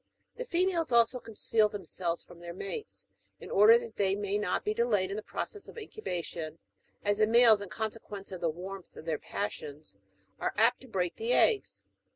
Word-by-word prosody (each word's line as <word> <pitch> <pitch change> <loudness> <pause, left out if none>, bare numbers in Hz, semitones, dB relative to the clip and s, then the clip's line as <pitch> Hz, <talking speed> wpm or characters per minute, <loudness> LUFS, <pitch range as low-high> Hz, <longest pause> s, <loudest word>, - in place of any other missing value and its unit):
The - - -5
females 350 - +1
also 235 +1 +4
conceal 220 -1 +1
themselves 180 -3 -3
from 175 - -15
their 170 0 -8
mates, 195 - -6 0.3
in - - -10
order 215 +4 +8
that 235 -2 -8
they 195 -1 +2
may 205 0 -1
not 200 -3 -1
be 210 - +1
delayed 215 -5 +1
in - - -2
the 215 - -3
process 410 - -5
of - - -12
incubation, 175 - -5 0.5
as 205 +1 +2
the 215 - +5
males, 230 -2 +7
in 200 - -6
consequence 215 -2 -5
of 185 - -6
the 165 - +2
warmth 185 +3 -7
of - - -10
their 160 -2 -1
passions, 150 - -5 0.4
are - - -1
apt 225 +3 +4
to 260 - -13
break 185 -6 -1
the 460 +3 0
eggs. 440 -4 +2
210 Hz, 190 wpm, -30 LUFS, 185-235 Hz, 0.5 s, order